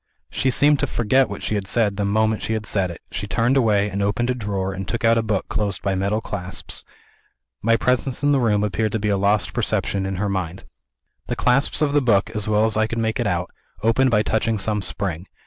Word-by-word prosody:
She 130 - 0
seemed 145 +2 +4
to 145 - 0
forget 130 +3 +2
what - - -7
she - - -2
had 100 -2 -2
said, 105 -1 +2
the 100 0 -1
moment 110 +2 +1
she 110 - -2
had 110 -1 -3
said 95 -4 0
it 85 - -9
she 100 - -4
turned 120 +5 +1
away, 105 -6 +3
and 100 0 -3
opened 115 +5 0
a - - +1
drawer, 100 -5 -3
and 95 0 -6
took 115 -1 -2
out 115 0 +5
a - - +2
book 105 -3 -2
closed 100 -3 -1
by 100 -1 0
metal 100 +3 0
clasps. 90 -3 -5 0.8
My 115 +1 +3
presence 125 +2 0
in 145 - +4
the 140 - +3
room 105 -4 +2
appeared 105 +1 -1
to 110 - 0
be 105 +1 -1
a 100 - +2
lost 100 -3 +1
perception 95 -1 -1
in 95 - -3
her 100 +3 -1
mind. 95 -2 -3 0.6
The - - -2
clasps 135 +4 +2
of 145 -1 +1
the 145 - +4
book, 105 -5 +2
as 105 -1 -2
well 105 0 +3
as 110 - 0
I 110 0 +2
could 115 - -4
make 110 0 -1
it 120 - 0
out, 90 -2 -2 0.3
opened 120 +4 +3
by 105 -3 +3
touching 110 0 0
some 105 +1 -1
spring. 90 -1 -3
105 Hz, 240 wpm, -22 LUFS, 100-115 Hz, 0.8 s, out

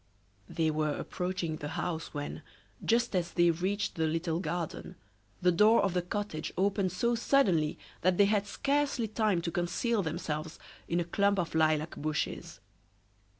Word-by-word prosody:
They 160 -2 +1
were 155 -1 0
approaching 180 -3 -3
the 145 - -5
house 160 +1 -3
when, 145 -1 -5 0.4
just 230 -3 +2
as 175 -1 -1
they 175 -1 +4
reached 190 +5 -1
the 160 -1 0
little 165 +1 -1
garden, 170 -2 -4 0.5
the 180 - +5
door 210 +6 +5
of 195 -3 +1
the 180 - +1
cottage 180 -3 -4
opened 195 -1 +1
so 235 +7 +1
suddenly 200 - +2 0.2
that 180 0 +2
they 200 - +6
had 205 0 +1
scarcely 275 0 0
time 215 -5 +1
to 170 - -2
conceal 205 +7 0
themselves 160 -2 -4 0.3
in 170 - 0
a - - +1
clump 200 +3 +2
of 175 -3 -1
lilac 155 0 +2
bushes. 155 0 -3
175 Hz, 155 wpm, -30 LUFS, 160-205 Hz, 0.5 s, they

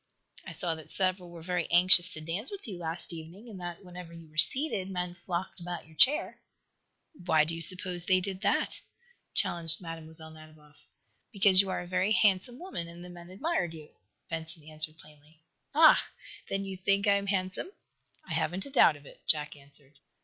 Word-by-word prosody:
"I - - -6
saw 175 -3 +1
that 160 -1 -11
several 185 -2 +1
were 170 -1 -11
very 180 -1 -2
anxious 180 0 +7
dance 165 - -5
with 400 -8 -8
you 190 -5 -7
last 170 +1 -3
evening, 170 +8 -10
and 200 -5 -10
that, 175 +2 -8
whenever 180 -1 -10
you 165 -1 -12
were - - -23
seated, 210 - +4
men 180 -2 -4
flocked 175 +2 -5
about 175 0 -7
your 160 0 -19
chair." 300 - +3 0.7
"Why 165 - +2
do 160 +2 -2
you 165 - -5
suppose 180 +1 -2
they 185 +1 +3
did 190 0 -5
that?" - - 0 0.5
challenged 165 -2 0
Mlle. 165 -2 -7
Nadiboff. 155 -1 -15 0.4
"Because 195 -3 +6
you 195 - -5
are - - -2
a - - -8
very 185 +4 0
handsome 210 +4 +2
woman, 315 - -6
and 170 +1 -11
the - - -11
men 175 0 -12
admired 190 - -2
you," 155 -1 -12 0.4
Benson 160 -1 -1
answered, 155 +1 -1
plainly. 150 0 -19 0.4
"Ah! 315 0 +6 0.4
Then 195 0 -3
you 190 -1 -7
think 195 +2 +1
I 200 -1 +4
am 200 0 -5
handsome?" 190 - -2 0.6
"I - - -5
haven't 180 +4 -2
a 280 - -11
doubt 205 - +5
of 145 0 -16
it," - - -16
Jack 150 -1 +1
answered. 140 0 -18
175 Hz, 185 wpm, -29 LUFS, 160-190 Hz, 0.7 s, anxious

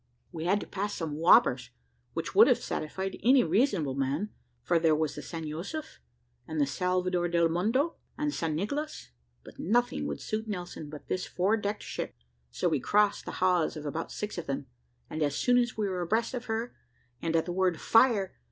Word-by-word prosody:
We 165 -2 -5
had 195 +4 +3
to - - -6
pass 205 +1 -3
some 160 -3 -3
whoppers, 180 +9 +5 0.4
which - - -3
would 445 +3 +8
have - - +5
satisfied 190 +5 -4
any 255 +4 +6
reasonable 180 - +2
man; 140 +10 -1 0.3
for 170 +6 +3
there 160 -1 +4
was 155 -1 0
the - - -7
San 165 -2 -6
Josef, 195 - -6 0.5
and 155 -3 0
Salvador 180 +2 0
del 170 -1 +3
Mondo, 225 - +1 0.2
and 300 -1 -1
San 160 -2 -1
Nicolas; 285 - -3 0.3
but - - -14
nothing 240 +5 +1
would - - -4
suit 220 +1 -3
Nelson 175 -6 -5
but 150 -1 -10
this 185 - -2
four 190 +5 +1
decked 205 -1 -3
ship; - - -5 0.3
so - - -1
we - - +1
crossed 210 0 +2
the - - -5
hawse 180 -4 +3
of 150 - -7
about 160 +3 -4
six 210 -3 -4
of 170 - -7
them, 135 0 -2 0.4
and 155 - -5
as 145 -1 +1
soon 245 0 +3
as 240 -2 -1
we 210 -2 0
were 185 -2 -2
abreast 220 +8 0
of 250 -1 -4
her, 225 +2 -3 0.5
and 165 0 -1
at 165 - +2
the 175 - -3
word 185 -1 +2
`Fire!' 220 0 +4
185 Hz, 195 wpm, -29 LUFS, 160-220 Hz, 0.5 s, would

